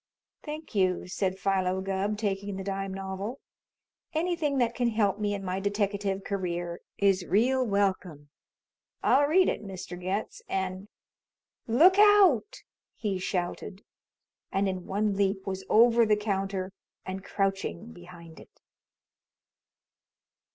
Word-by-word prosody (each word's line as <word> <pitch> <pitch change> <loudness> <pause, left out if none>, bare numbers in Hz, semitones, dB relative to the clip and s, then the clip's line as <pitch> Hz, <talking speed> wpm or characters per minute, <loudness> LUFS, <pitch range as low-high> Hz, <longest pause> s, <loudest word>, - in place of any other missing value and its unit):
"Thank 305 -1 -8
you," 185 -3 +1
said 190 0 -2
Philo 190 -1 0
Gubb, 195 +2 -2
taking 200 -1 -2
the 190 - -5
dime 195 0 -3
novel. 195 +6 -5 0.8
"Anything 320 -4 0
that 240 -2 +2
can 245 0 0
help 210 -3 +1
me 205 -1 0
in 195 -1 -6
my 185 +1 -2
deteckative 200 -1 -1
career 175 -3 -3 0.2
is 195 -2 +3
real 245 +9 +2
welcome. 185 - -1 0.7
I'll 285 +2 +4
read 365 +5 +4
it, - - -1
Mr. 185 -2 -7
Getz, 200 - -3
and 190 +1 -3 0.8
Look 340 - +5
out!" 395 - +5 0.3
he 200 -4 -2
shouted, 185 +2 -3 0.7
and 195 +1 +1
in 185 -2 -4
one 205 +1 0
leap 195 -1 0
was 190 -1 -4
over 235 +1 +6
the 210 -1 +3
counter 195 -2 -2 0.3
and 190 0 -5
crouching 195 +4 -2
behind 175 -2 -13
it. - - -18
195 Hz, 125 wpm, -28 LUFS, 190-220 Hz, 0.8 s, over